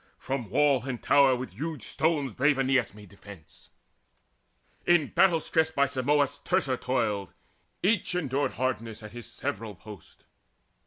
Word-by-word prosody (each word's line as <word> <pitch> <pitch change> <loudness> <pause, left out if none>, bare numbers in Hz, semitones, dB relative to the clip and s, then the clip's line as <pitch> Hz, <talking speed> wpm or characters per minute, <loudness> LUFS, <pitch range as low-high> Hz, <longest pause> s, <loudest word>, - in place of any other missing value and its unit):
From 130 -5 -4
wall 140 +1 +2
and 125 -3 -4
tower 140 -2 +5
With 125 -5 -6
huge 145 - -5
stones 145 -5 0
brave 140 +4 +2
Aeneas 130 -6 +1
made 105 -2 -13
defence. 100 -4 -15 1.2
In 175 -5 +4
battle 175 -4 +4
stress 160 0 +1
by 140 -3 +2
Simons 140 +1 +1
Teucer 180 -8 0
toiled. 105 -9 -1 0.5
Each 195 -2 +1
endured 145 -5 -1
hardness 115 -4 -3
at 105 - -9
his 120 0 -10
several 110 0 -5
post. 105 -2 -14
130 Hz, 140 wpm, -28 LUFS, 110-150 Hz, 1.2 s, tower